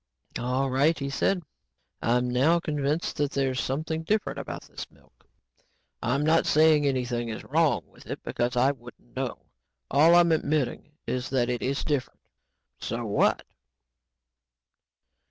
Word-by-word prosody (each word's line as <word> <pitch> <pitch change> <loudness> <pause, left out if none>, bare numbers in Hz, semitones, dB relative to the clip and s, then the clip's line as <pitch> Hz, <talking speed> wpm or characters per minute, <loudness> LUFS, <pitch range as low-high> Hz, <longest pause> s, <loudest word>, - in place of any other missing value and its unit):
"All 130 +2 0
right," 145 +5 +3
he 140 -1 -4
said, 180 +6 +1 0.6
"I'm 125 +1 +2
now 135 +8 +3
convinced 150 0 -2
that 145 -2 +1
there's 135 -2 0
something 155 +4 -2
different 210 +6 -1
about - - -6
this - - -9
milk. - - -27 0.7
I'm 130 +5 0
not 160 +1 +3
saying 155 -1 +5
anything 125 -3 -1
is 110 - -5
wrong 160 +1 +2
with - - -19
it - - -6
because 120 +1 -1
I 130 +3 +4
wouldn't 120 -2 -14
know. 130 -1 -4 0.5
All 155 +5 +6
I'm 175 -1 +5
admitting 150 -2 -1
is 130 0 -3
that 125 -2 +1
it 120 - -2
is 135 +1 -1
different. 145 -4 -2 0.6
So - - -4
what?" - - +2
140 Hz, 140 wpm, -27 LUFS, 125-155 Hz, 0.7 s, All